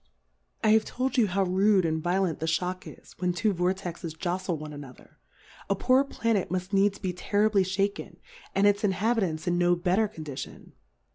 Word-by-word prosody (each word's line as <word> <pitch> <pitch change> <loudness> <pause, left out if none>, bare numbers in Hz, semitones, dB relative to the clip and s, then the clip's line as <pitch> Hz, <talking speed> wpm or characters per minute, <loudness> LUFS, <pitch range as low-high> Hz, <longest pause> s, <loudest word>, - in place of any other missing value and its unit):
I 215 - +4
have 220 0 +5
told 260 +5 -3
you 235 -5 +4
how 195 +1 +1
rude 190 +1 +3
and 160 -1 -1
violent 175 -1 0
the 160 - -2
Shock 180 +3 -2
is, - - -13
when 180 -1 0
two 205 +4 +1
Vortexes 180 -2 -3
joftle 180 0 -2
one 150 0 -8
another, 140 -3 -12 0.5
a 200 - +2
poor 255 +6 +3
Pla 230 -4 -1
net 195 -3 0
muft 185 +2 -3
needs 200 0 +3
be 185 -3 -3
terribly 205 +2 +2
fhaken, 195 +2 -2 0.4
and 195 +1 +3
its 205 0 +3
Inhabitants 190 -5 0
in 175 0 +1
no 175 0 +4
better 185 +5 +1
Condition. 155 -8 -8
185 Hz, 180 wpm, -27 LUFS, 175-205 Hz, 0.5 s, have